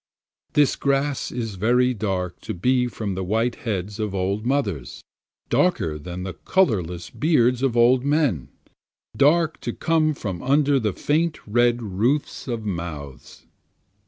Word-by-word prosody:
This 145 -2 +3
grass 140 0 0
is 115 -5 -4
very 125 +3 +3
dark 95 -5 -3
to - - -5
be 125 +7 +2
from 110 -4 -4
the 95 +1 -3
white 115 +6 0
heads 105 -5 -4
of 105 -2 -2
old 100 +4 -1
mothers, 105 - -2 0.5
Darker 120 - +1
than 90 +3 -6
the 95 -1 -5
colorless 90 - 0
beards 125 -6 +2
of 130 -3 +1
old 125 +2 +5
men, 140 - +1 0.7
Dark 160 +3 +3
to - - -4
come 155 -2 +1
from 95 -9 -5
under 140 +1 +3
the 105 -5 -1
faint 160 - 0
red 120 +2 +2
roofs 115 +12 -1
of 115 -3 -3
mouths. 85 -8 -6
120 Hz, 140 wpm, -23 LUFS, 95-140 Hz, 0.7 s, old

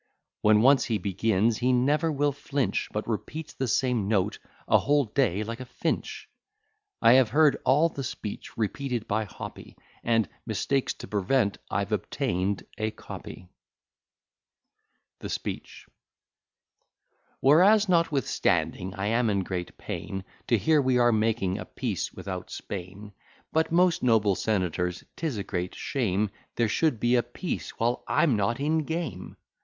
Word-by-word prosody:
When 105 0 +5
once 135 0 +5
he 110 - 0
begins, 105 +3 +1
he 125 +1 +2
never 145 +6 +2
will 145 0 +1
flinch, 140 -1 -2
But 105 - -3
repeats 145 +8 -4
the 130 - -2
same 120 -3 +1
note 100 -3 +1 0.3
a - - +5
whole 145 -1 +2
day 105 -4 +1
like 115 +3 -6
a 130 - -6
Finch. - - -3 0.8
I 115 - +8
have 130 -3 +5
heard 150 +4 +4
all 150 +5 +5
the 140 -4 -6
speech 105 -4 -6
repeated 120 +1 -2
by 110 +1 0
Hoppy,' 100 - -10 0.3
And, 115 -3 +2 0.2
"mistakes 135 -1 -1
to - - -9
prevent, 100 +2 +1
I've - - -1
obtained 95 +3 -1 0.2
a 110 0 0
copy." 90 -4 -10 1.7
THE - - -6
SPEECH - - -5 1.5
Whereas, 195 +10 +6
notwithstanding 145 - +1
I 100 0 -3
am 115 +2 +2
in 100 -2 +1
great 90 -1 -5
pain, 95 -1 -5 0.2
To 120 - +4
hear 150 - +3
we 130 -2 +2
are 120 -1 +5
making 110 -3 +1
a - - -6
peace 110 - -3
without - - -6
Spain; 100 +2 -7 0.4
But, 160 0 +2
most 175 +1 +3
noble 110 -5 +3
senators, 90 -3 -1
'tis 155 -8 -3
a 100 - -2
great 90 -2 -4
shame, 105 -6 -1 0.2
There 115 - +2
should 150 -2 +1
be 120 +2 +2
a 125 - +5
peace, 120 +9 -5
while 120 +2 0
I'm 145 -8 +3
_Not 105 +4 0
in 155 +3 +1
game. 160 - -4
115 Hz, 145 wpm, -27 LUFS, 100-140 Hz, 1.7 s, I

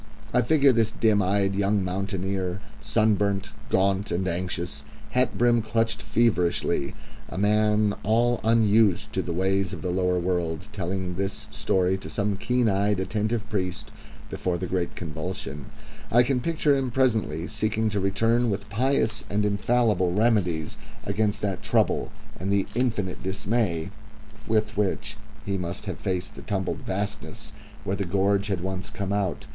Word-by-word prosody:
I 125 - +4
figure 140 +2 +5
this 115 -3 +2
dim 110 -2 +2
eyed 100 +1 +1
young 100 0 +1
mountaineer, 95 0 -2 0.2
sunburnt, 105 -2 +1 0.2
gaunt, 95 +1 +2
and 95 +2 -1
anxious, 90 0 -3 0.3
hat 125 +3 +1
brim 120 -1 +4
clutched 115 0 0
feverishly, 90 -10 +1 0.3
a - - -7
man 105 +1 +3
all 120 +3 +2
unused 110 -3 +3
to - - +1
the - - -4
ways 95 +2 +1
of - - -6
the 90 - -1
lower 90 0 +1
world, 85 -1 -1
telling 95 -2 -3
this 100 +1 -3
story 95 0 +1
to 80 - -8
some 100 +3 0
keen 125 +4 +1
eyed, 100 0 +2
attentive 110 +3 -1
priest 95 -5 -3 0.4
before 90 -1 -2
the 90 - -3
great 90 -1 -2
convulsion; 75 -3 -5 0.4
I 120 +2 +5
can 125 0 0
picture 155 0 +2
him 135 -2 0
presently 110 - +1
seeking 110 +3 0
to 105 - 0
return 115 +5 +2
with 100 0 -3
pious 115 -1 +1
and 105 +1 +1
infallible 105 -3 +2
remedies 95 -7 +1 0.3
against 105 +1 0
that 100 -3 -2
trouble, - - +1 0.3
and 95 +2 -2
the 100 -1 +2
infinite 110 -7 -1
dismay 95 -3 -1 0.6
with 110 -1 +1
which 100 -2 -1 0.3
he 100 -1 -1
must 90 +3 -4
have 90 -6 -5
faced 95 -2 -2
the - - -10
tumbled 95 -3 -2
vastness 100 +2 -4 0.3
where 95 - -1
the 100 - -2
gorge 100 +2 +1
had 95 -5 -1
once 95 +1 -3
come 100 -1 -3
out. 100 -3 -1
100 Hz, 150 wpm, -26 LUFS, 95-110 Hz, 0.6 s, figure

